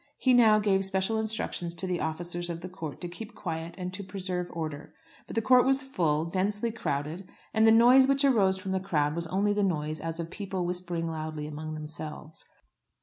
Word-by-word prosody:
He 255 - +3
now 225 -3 +6
gave 200 -2 +2
special 190 +3 +1
instructions 215 -6 -2
to 190 - -2
the 180 -2 -1
officers 175 +2 -3
of 170 -1 -4
the 185 - -6
court 160 -5 -7
to 175 - -3
keep 215 +6 -9
quiet 165 -3 -5
and 180 -1 -5
to 200 +2 -5
preserve 185 -2 -3
order. 155 -3 -6 0.3
But - - -8
the 225 - +1
court 250 +1 +6
was 270 +1 +2
full, 165 - 0
densely 205 +6 -1
crowded; 160 -2 -3 0.2
and 220 0 +5
the - - +8
noise 245 +4 +7
which 275 +1 +3
arose 200 -8 +4
from 190 0 -5
the 190 - +1
crowd 150 -6 0
was 170 +1 -2
only 200 +4 +1
the 205 - 0
noise 155 -5 -1
as 165 0 -4
of 165 0 -5
people 190 -3 -3
whispering 175 -1 -3
loudly 155 -1 -4
among 155 +1 -6
themselves. 155 0 -7
180 Hz, 205 wpm, -28 LUFS, 160-210 Hz, 0.3 s, the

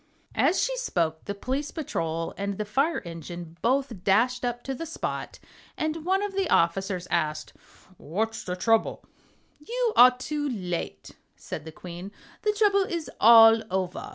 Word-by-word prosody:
As 370 - +2
she - - 0
spoke 165 - -1
the 200 - -4
Police 265 +7 -3
Patrol 165 - -3
and 200 0 -3
the 210 - -2
Fire 275 +10 0
Engine 170 0 -8
both 250 -6 0
dashed 240 +6 +2
up 240 0 -2
to 270 - -3
the 325 +6 -6
spot, 325 - -4 0.4
and 310 +1 -2
one 385 +2 +2
of 410 -1 -3
the 385 -2 -1
officers 180 +2 +1
asked: 155 -3 -1 0.4
"What's 220 +8 -3
the 180 - -3
trouble?" 225 +4 +1 0.5
"You 470 +8 -1
are 250 +1 +8
too 290 +2 -3
late," 180 - -4 0.2
said - - -7
the 160 - -8
Queen; 175 +4 -9 0.3
"the 425 - +2
trouble 410 -1 +3
is 340 -4 -3
all 225 0 +8
over." 185 -1 -3
225 Hz, 155 wpm, -26 LUFS, -, 0.5 s, are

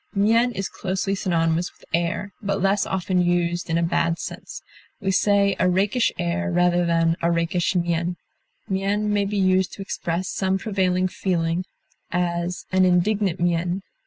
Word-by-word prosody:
Mien 225 +5 +3
is 195 -2 -3
closely 190 +1 -2
synonymous 170 -3 0
with - - -22
air, 170 +4 -1
but 200 -1 -1
less 195 +1 +1
often 185 -1 0
used 175 0 0
in 165 - +1
a 170 - +1
bad 170 0 +1
sense. - - -7 0.4
We 195 -3 -1
say 200 0 +3
a 180 - +3
rakish 205 +6 +2
air 180 +2 -1
rather 175 0 +2
than 165 0 +2
a 170 - +2
rakish 170 +2 0
mien. 175 0 0 0.5
Mien 200 +2 0
may 205 -1 +2
be 205 +1 -2
used 185 -1 +2
to - - -8
express 180 -1 -3
some 190 -1 0
prevailing 185 -3 0
feeling; 175 -1 -1 0.4
as, 175 0 -2
"an 185 0 +4
indignant 185 +1 +2
mien." 175 +2 0
185 Hz, 160 wpm, -23 LUFS, 170-195 Hz, 0.5 s, an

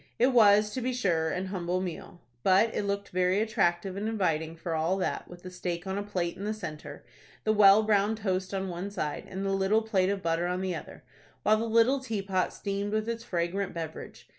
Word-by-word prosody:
It 255 +3 +3
was, 210 -2 +6
to 255 - -3
be 255 +1 -1
sure, 170 -9 +1
an 180 +4 -2
humble 185 -1 -2
meal; 180 -1 -6 0.2
but 195 - +4
it 205 - -1
looked 200 0 -2
very 185 +2 +2
attractive 190 -4 0
and 205 +2 -3
inviting 165 -7 -1
for 165 0 -4
all 165 +4 +1
that, 185 - -2
with 175 0 -13
the 185 - -8
steak 175 -1 -4
on 190 +1 -2
a - - -2
plate 185 -4 -2
in 195 - -8
the 215 +1 -2
centre, 150 -7 -8 0.4
the 215 - +2
well 205 0 +7
browned 210 0 +2
toast 190 -3 -2
on 195 -1 -2
one 180 +2 -4
side, 155 -7 -4
and 195 +1 -4
the 195 - 0
little 195 +3 +2
plate 195 -4 +1
of 200 -1 -2
butter 165 +1 0
on 180 +1 -2
the 190 -1 -1
other, 165 - -8 0.4
while 215 +1 +4
the 225 - -1
little 230 +5 +4
teapot 200 -7 -1
steamed 200 +1 -3
with 215 0 0
its 230 0 -3
fragrant 180 0 -2
beverage. 160 -2 -7
195 Hz, 215 wpm, -29 LUFS, 175-210 Hz, 0.4 s, well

